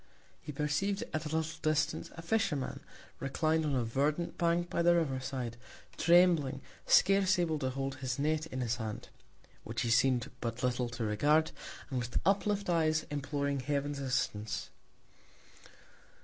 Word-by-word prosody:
He 150 Hz, -, -7 dB
perceiv'd 150 Hz, +8 st, -1 dB
at 155 Hz, 0 st, -2 dB
a 160 Hz, +1 st, -1 dB
little 160 Hz, 0 st, -3 dB
Distance 155 Hz, -1 st, 0 dB
a 165 Hz, -, -8 dB
Fisherman, 165 Hz, -8 st, 0 dB, 0.4 s
reclin'd 155 Hz, +4 st, +1 dB
on 145 Hz, -2 st, 0 dB
a 125 Hz, -, +1 dB
verdant 145 Hz, +8 st, 0 dB
Bank 170 Hz, 0 st, +1 dB
by 170 Hz, -, -1 dB
the 175 Hz, 0 st, +5 dB
River 145 Hz, -6 st, +1 dB
side, 130 Hz, -2 st, -4 dB, 0.4 s
trembling, 170 Hz, -6 st, +4 dB, 0.3 s
scarce 195 Hz, 0 st, +5 dB
able 165 Hz, -3 st, 0 dB
to 130 Hz, -2 st, -1 dB
hold 135 Hz, 0 st, -3 dB
his 130 Hz, -2 st, -3 dB
Net 155 Hz, +2 st, 0 dB
in 130 Hz, -3 st, -4 dB
his 120 Hz, -1 st, 0 dB
Hand, 110 Hz, -2 st, -5 dB, 0.5 s
(which 115 Hz, +2 st, -3 dB
he 115 Hz, -, 0 dB
seem'd 120 Hz, +1 st, +3 dB
but 115 Hz, +2 st, -3 dB
little 125 Hz, -1 st, 0 dB
to 120 Hz, 0 st, -4 dB
regard) 145 Hz, +9 st, +2 dB, 0.4 s
and 130 Hz, -, 0 dB
with 120 Hz, 0 st, -3 dB
uplift 200 Hz, +1 st, +1 dB
Eyes, 155 Hz, -2 st, +2 dB
imploring 140 Hz, -1 st, -1 dB
Heaven's 140 Hz, +1 st, -2 dB
Assistance. 120 Hz, -6 st, -2 dB
145 Hz, 150 wpm, -32 LUFS, 130-160 Hz, 0.5 s, the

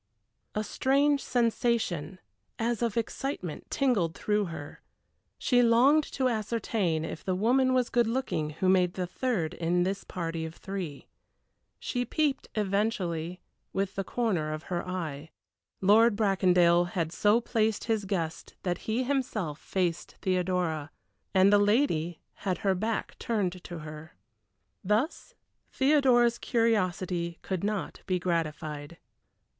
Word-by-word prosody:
A 215 Hz, -, 0 dB
strange 280 Hz, +5 st, +2 dB
sensation, 230 Hz, -, 0 dB, 0.4 s
as 235 Hz, 0 st, -1 dB
of 235 Hz, -2 st, 0 dB
excitement, 230 Hz, -, -3 dB
tingled 210 Hz, -12 st, +1 dB
through 210 Hz, -1 st, 0 dB
her. 160 Hz, -4 st, -8 dB, 0.6 s
She 245 Hz, -1 st, +3 dB
longed 250 Hz, +6 st, +5 dB
to 260 Hz, -2 st, +1 dB
ascertain 215 Hz, -7 st, -1 dB
if 160 Hz, -, -6 dB
the 185 Hz, -, 0 dB
woman 255 Hz, +6 st, +3 dB
was 250 Hz, -2 st, +1 dB
good 240 Hz, -2 st, +3 dB
looking 230 Hz, -11 st, -1 dB
who 160 Hz, +5 st, -2 dB
made 185 Hz, -1 st, +3 dB
the 185 Hz, -, -1 dB
third 180 Hz, -4 st, -1 dB
in 175 Hz, +1 st, +1 dB
this 195 Hz, +2 st, -2 dB
party 165 Hz, -2 st, -4 dB
of 160 Hz, +1 st, -6 dB
three. 185 Hz, -8 st, -6 dB, 0.7 s
She 245 Hz, -1 st, -2 dB
peeped 290 Hz, +1 st, 0 dB
eventually 190 Hz, -5 st, -1 dB, 0.3 s
with 195 Hz, 0 st, -1 dB
the 195 Hz, -, -2 dB
corner 185 Hz, -9 st, -1 dB
of 155 Hz, +1 st, -6 dB
her 175 Hz, -, -1 dB
eye. 160 Hz, -5 st, -4 dB, 0.5 s
Lord 215 Hz, +3 st, +5 dB
Bracondale 180 Hz, -4 st, +4 dB
had 170 Hz, -2 st, -2 dB
so 210 Hz, +5 st, +3 dB
placed 220 Hz, -2 st, 0 dB
his 220 Hz, -3 st, 0 dB
guests 170 Hz, -5 st, -3 dB
that 175 Hz, -2 st, -1 dB
he 235 Hz, +4 st, +1 dB
himself 245 Hz, -, -2 dB
faced 175 Hz, -3 st, -2 dB
Theodora, 180 Hz, -5 st, 0 dB, 0.4 s
and 190 Hz, +1 st, +5 dB
the 205 Hz, -, +7 dB
lady 205 Hz, -, +1 dB, 0.2 s
had 185 Hz, -3 st, -1 dB
her 195 Hz, -, +4 dB
back 220 Hz, +4 st, -3 dB
turned 185 Hz, -6 st, -1 dB
to 175 Hz, -, -6 dB
her. 155 Hz, +1 st, -9 dB, 0.7 s
Thus 215 Hz, -, -1 dB, 0.4 s
Theodora's 260 Hz, -4 st, +4 dB
curiosity 185 Hz, -7 st, 0 dB
could 190 Hz, -2 st, -3 dB
not 210 Hz, -1 st, -2 dB
be 185 Hz, -1 st, +1 dB
gratified. 155 Hz, -3 st, -3 dB
195 Hz, 130 wpm, -29 LUFS, 170-230 Hz, 0.7 s, the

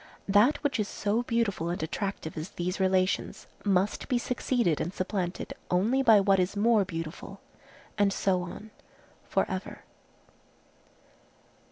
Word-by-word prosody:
That 205 Hz, +9 st, +5 dB
which 285 Hz, -5 st, 0 dB
is 210 Hz, -, 0 dB
so 210 Hz, +4 st, -1 dB
beautiful 225 Hz, -8 st, -1 dB
and 175 Hz, -2 st, -3 dB
attractive 195 Hz, 0 st, -4 dB
as 155 Hz, +3 st, -5 dB
these 180 Hz, +2 st, -3 dB
relations, 185 Hz, 0 st, +1 dB, 0.2 s
must 195 Hz, 0 st, +1 dB
be 255 Hz, -, +1 dB
succeeded 240 Hz, -, 0 dB
and 175 Hz, -, -2 dB
supplanted 185 Hz, -1 st, -3 dB, 0.2 s
only 215 Hz, +9 st, +2 dB
by 225 Hz, -5 st, +7 dB
what 195 Hz, -1 st, +3 dB
is 185 Hz, +2 st, 0 dB
more 220 Hz, 0 st, +4 dB
beautiful, 165 Hz, -3 st, -7 dB, 0.6 s
and 200 Hz, -1 st, +4 dB
so 190 Hz, -2 st, +1 dB
on 200 Hz, +5 st, -8 dB, 0.6 s
for -, -, +2 dB
ever. -, -, -6 dB
195 Hz, 135 wpm, -28 LUFS, 180-220 Hz, 0.6 s, by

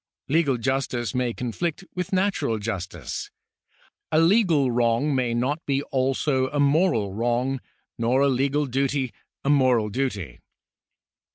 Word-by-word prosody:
Legal 145 Hz, -3 st, +2 dB
justice 130 Hz, -1 st, -1 dB
may 125 Hz, -2 st, 0 dB
conflict 150 Hz, -, -3 dB
with 180 Hz, -2 st, -4 dB
natural 190 Hz, -, +1 dB
justice; 95 Hz, -, -5 dB, 0.8 s
a 155 Hz, -, +4 dB
legal 165 Hz, -, +4 dB
wrong 120 Hz, +4 st, +2 dB
may 125 Hz, -3 st, +1 dB
not 140 Hz, +7 st, -1 dB
be 140 Hz, 0 st, +1 dB
also 130 Hz, 0 st, +1 dB
a 145 Hz, -, -2 dB
moral 140 Hz, -, +2 dB
wrong, 120 Hz, +4 st, 0 dB, 0.4 s
nor 120 Hz, +4 st, +2 dB
a 140 Hz, -, +4 dB
legal 140 Hz, +3 st, +1 dB
duty 135 Hz, 0 st, -1 dB, 0.3 s
a 140 Hz, -, 0 dB
moral 130 Hz, -6 st, +3 dB
duty. 100 Hz, -, -3 dB
130 Hz, 125 wpm, -24 LUFS, 120-145 Hz, 0.8 s, a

